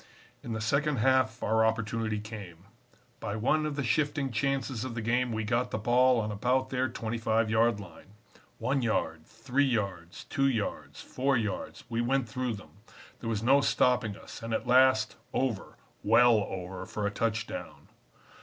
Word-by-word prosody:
"In 120 - -5
the 110 - -3
second 140 +6 +1
half 130 -1 +2
our 110 +1 +3
opportunity 110 -1 0
came. 100 -5 -9 0.5
By 100 - -4
one 155 +8 +1
of 150 - -4
the 140 - -2
shifting 145 -2 0
chances 130 0 -1
of 130 -3 -5
the 115 - -3
game 120 +2 +1
we 110 -1 -2
got 120 +3 0
the - - -2
ball 125 +3 +4
on 105 -1 -2
about 125 +5 0
their 130 -1 0
25 115 -1 -1
yard 115 -1 +3
line; 95 +1 -13 0.4
one 135 +1 0
yard, 80 -9 -1
three 125 +5 0
yards, 100 -9 -2
two 135 -2 0
yards, 115 -6 -3
four 135 +1 0
yards, 105 -5 -4
we 115 -1 -1
went 130 +1 +1
through 125 +2 -2
them; 100 - -14 0.4
there 115 - -4
was 110 -1 -1
no 135 +4 +5
stopping 125 -7 +2
us, - - -11
and 115 0 -2
at - - -3
last 125 -4 +4 0.2
over, 125 -7 -2 0.2
well 115 -1 +5
over, 95 0 -6
for 105 - -3
a 100 - 0
touchdown. 110 +1 -3
115 Hz, 170 wpm, -29 LUFS, 105-130 Hz, 0.5 s, no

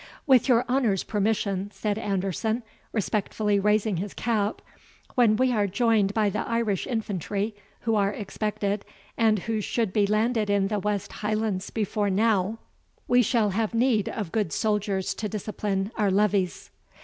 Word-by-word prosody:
"With 265 -3 +4
your 240 -1 +4
honour's 245 -7 +1
permission," 200 -2 -1
said 210 0 -2
Anderson, 205 +3 -1 0.3
respectfully 210 -1 0
raising 210 -1 +2
his 195 +3 -4
cap, 220 -3 -1 0.5
"when 235 -4 +4
we 255 +3 +2
are 210 -4 +2
joined 205 0 +2
by 210 -2 +2
the - - -2
Irish 230 -5 -1
infantry, 210 - -2 0.3
who 225 - 0
are 200 -2 +3
expected, 205 0 -3 0.3
and 220 -2 +3
who 220 +3 -2
should 220 -2 -1
be 205 -2 +3
landed 215 +1 +1
in 200 -1 +2
the 210 -1 0
West 205 0 -2
Highlands 210 -2 -2
before 210 -1 -1
now, 210 0 +2 0.5
we 245 0 +5
shall 220 -3 +2
have 220 +3 -1
need 230 -3 +2
of 205 -7 -4
good 210 -7 0
soldiers 205 -1 0
to 210 - -4
discipline 205 -1 -2
our 210 -3 +2
levies." 195 -2 +1
210 Hz, 150 wpm, -26 LUFS, 200-225 Hz, 0.5 s, we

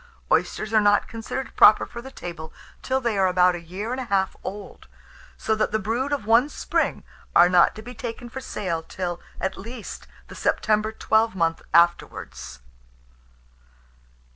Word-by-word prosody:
Oysters 215 +1 0
are 215 - +5
not 205 0 +3
considered 225 +4 -6
proper 215 - +7
for 235 - -9
the 265 - -10
table 170 -9 -8 0.3
till 265 0 0
they 235 -6 -1
are 190 - +4
about 180 0 +4
a 175 - -6
year 190 +7 -6
and 260 +1 -2
a - - -5
half 195 -3 0
old; 200 +1 -8 0.5
so 220 - 0
that 215 -1 0
the 220 - +2
brood 230 +7 -2
of 280 -7 -2
one 230 +6 +4
spring - - -1 0.3
are 175 - +8
not 180 -1 +4
to 215 - -9
be 245 +2 -9
taken 240 0 -6
for 265 +3 -7
sale, 185 -9 -3
till, 175 +1 -5 0.2
at 190 0 -3
least, 230 +2 -8 0.2
the - - -11
September 215 0 +1
twelvemonth 205 -7 +1
afterwards. 170 - +1
215 Hz, 165 wpm, -24 LUFS, 180-230 Hz, 0.5 s, are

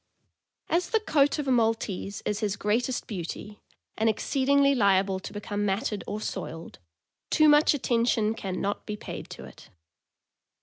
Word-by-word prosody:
As 340 +1 0
the 445 - +2
coat 290 -9 +2
of 295 -2 -3
a - - +2
Maltese 225 -4 0
is 210 - -1
his 205 -2 -1
greatest 230 +5 -1
beauty, 205 +2 -6 0.3
and 225 +1 +2
exceedingly 275 +5 +2
liable 195 -5 +2
to - - -8
become 205 0 -4
matted 205 +1 -1
or 210 - -3
soiled, 170 -5 -6 0.5
too 310 -1 +4
much 295 0 +5
attention 230 -4 +1
can 190 -4 -4
not 200 +1 -3
be 210 -1 -4
paid - - -8
to - - -9
it. - - -15
215 Hz, 150 wpm, -27 LUFS, 200-275 Hz, 0.5 s, much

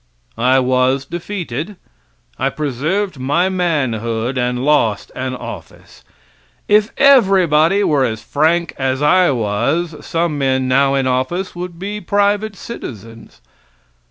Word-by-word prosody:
I 130 +3 +3
was 130 +1 +1
defeated. 175 - -5 0.6
I - - +1
preserved 155 +5 -2
my 145 +8 +1
manhood 130 - -1
and 125 0 -1
lost 130 -9 +1
an 130 0 -3
office. - - -10 0.6
If 210 +1 +3
everybody 195 - +4
were 145 -7 +2
as 110 -3 -2
frank 160 +6 +1
as 130 +1 -1
I 180 +4 +4
was, 130 +9 -1
some 165 -3 -1
men 130 -1 +1
now 135 +1 +3
in 135 -1 0
office 130 +10 -1
would 175 -1 -6
be 205 +3 -5
private 205 +2 0
citizens. 115 - -10
150 Hz, 120 wpm, -17 LUFS, 130-180 Hz, 0.6 s, everybody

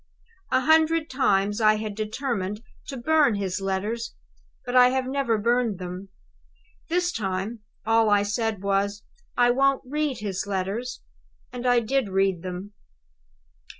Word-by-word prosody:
"A 255 - +3
hundred 315 +2 +3
times 205 -5 +1
I 215 0 +5
had 215 -1 -4
determined 215 -1 -3 0.2
to 270 - -5
burn 295 -1 +3
his 195 -1 -2
letters; 200 +5 -2 0.5
but 245 - -3
I 250 0 +8
have 260 0 0
never 260 -4 0
burned 235 -1 +1
them. 180 +1 -7 0.8
This, 350 +1 +1
time, 200 - -3 0.3
all 225 0 +4
I 205 -1 +4
said 215 -1 -2
was, 200 +1 0 0.3
'I 245 0 +5
won't 275 +1 +2
read 295 0 -1
his 200 -1 -3
letters!' 200 +6 -3 0.5
And 250 0 -3
I 245 -1 +4
did 240 -1 0
read 195 -2 +1
them. 185 +3 -6
220 Hz, 140 wpm, -25 LUFS, 200-255 Hz, 0.8 s, I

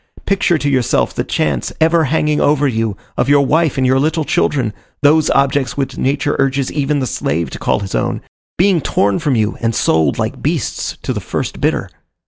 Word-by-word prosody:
picture 195 -3 +2
to 145 - -2
yourself 130 -4 +1
the - - -2
chance, 70 -5 -1
ever 160 0 +3
hanging 150 +1 +1
over 145 0 +3
you, 115 -5 -1 0.2
of 130 - +1
your 145 -1 +4
wife 160 +2 +1
and 130 - +1
your 130 +1 +3
little 155 +3 0
children 125 -8 0 0.3
those 155 +2 +4
objects 140 -1 +1
which 135 -2 -2
nature 145 +2 0
urges 135 -1 0
even 145 0 0
the 135 - -1
slave 80 - -2
to - - -7
call - - 0
his 95 - -6
own - - -1 0.4
being 185 -2 +3
torn 100 -6 +1
from 140 -4 0
you 110 -2 0
and 115 -1 0
sold 80 -4 +2
like - - -3
beasts - - -2
to - - -2
the - - -4
first - - -4
bidder! - - 0
140 Hz, 195 wpm, -16 LUFS, 115-150 Hz, 0.4 s, your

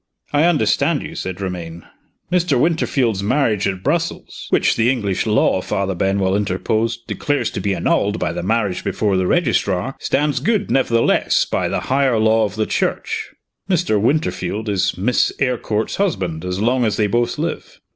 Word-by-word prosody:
"I 145 +2 +4
understand 145 - +2
you," - - -7
said 95 0 -5
Romayne. 85 -3 -5 0.5
"Mr. 175 -7 +2
Winterfield's 130 - +1
marriage 110 -3 +1
at 95 -1 -4
Brussels - - -2
" - - -13
"Which - - +2
the 115 +1 +2
English 105 -6 -1
law," 105 -3 +2
Father 95 +1 -2
Benwell 95 +1 +1
interposed, 110 +4 -1
"declares 145 -1 -1
to - - -4
be 100 -1 -1
annulled - - +1
by - - -2
the - - -4
marriage 100 -1 -1
before 105 -3 0
the 95 -1 +1
registrar, 125 - 0
stands 145 +1 0
good, 210 -2 0
nevertheless, 120 -3 +2
by - - -1
the - - -1
higher 135 -2 +1
law 110 0 +3
of 105 -1 -5
the 110 0 0
Church. - - -2 0.4
Mr. 170 - +1
Winterfield 110 - -1
is 95 -2 0
Miss 115 +7 +2
Eyrecourt's 115 -5 -1
husband, 95 - -1
as 90 +1 -3
long 125 +4 +2
as 110 -3 0
they 105 - +2
both 120 +4 0
live. - - -4
110 Hz, 165 wpm, -19 LUFS, 95-135 Hz, 0.5 s, I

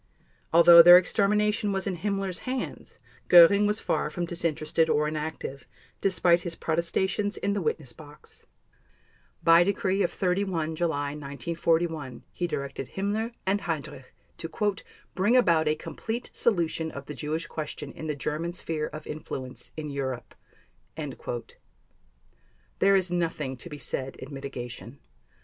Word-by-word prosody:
Although 170 +1 +9
their 175 +1 +10
extermination 210 +2 +1
was 195 -1 -2
in 190 -3 -2
Himmler's 195 -1 -2
hands, 255 0 -5 0.3
Göring 190 +4 +8
was 210 +1 0
far - - -1
from 175 +3 -3
disinterested 165 -1 0
or 150 0 +2
inactive, 150 -3 -5 0.3
despite 180 -3 +3
his 170 -2 -5
protestations 190 +6 -1
in 200 - -1
the 200 - -1
witness 150 -6 -2
box. 150 -2 -15 1.0
By 165 +1 +7
decree 195 0 0
of 175 - +2
31 180 -4 -1
July 150 -4 -1
1941 150 +1 -2
he 175 - -2
directed 140 -4 -5
Himmler 210 +4 -1
and 200 +2 +1
Heydrich 155 -7 -4 0.3
to 165 - -5 0.6
"bring 210 +7 +3
about 170 -10 +3
a 150 - +2
complete 225 +9 -5
solution 165 -6 0
of 140 -2 -8
the 150 - -7
Jewish 155 +5 -3
question 150 -3 -6
in 160 - -7
the 150 - -2
German 155 +4 -3
sphere 160 -3 -3
of 155 0 -9
influence 130 -4 -7
in 150 -2 -5
Europe." 130 -3 -4 0.6
There 130 -6 -5 1.5
is 185 -2 +1
nothing 165 -6 -1
to 175 - -8
be 150 - -7
said 135 -2 -4
in 135 +2 -10
mitigation. 125 -2 -7
165 Hz, 135 wpm, -27 LUFS, 150-190 Hz, 1.5 s, their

